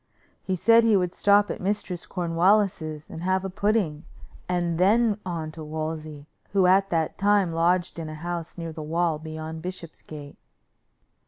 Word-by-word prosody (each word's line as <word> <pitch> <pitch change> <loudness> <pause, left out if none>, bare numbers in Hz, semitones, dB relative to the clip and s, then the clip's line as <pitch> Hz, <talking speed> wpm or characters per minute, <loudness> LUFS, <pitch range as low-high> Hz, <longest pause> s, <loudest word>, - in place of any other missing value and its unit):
He 190 - -2
said 230 +5 +5
he 220 -3 +4
would 180 -1 -1
stop 205 0 +3
at - - -6
Mistress 190 -3 -3
Cornwallis's 170 -3 +1
and 160 - -7
have 190 +1 0
a 190 - -4
pudding; 200 -6 0 0.5
and 175 -2 0
then 210 +3 +3
on 165 -3 -4
to 160 0 -9
Wolsey, 155 -1 -5 0.3
who 195 -2 +4
at 195 +2 +4
that 165 -3 -1
time 200 -4 +3
lodged 175 +1 +1
in 160 -1 -5
a 155 - -7
house 170 +1 -5
near 165 -2 -5
the 155 - -7
wall 165 0 0
beyond 160 0 -7
Bishopsgate. 160 -4 -9
175 Hz, 160 wpm, -25 LUFS, 160-195 Hz, 0.5 s, said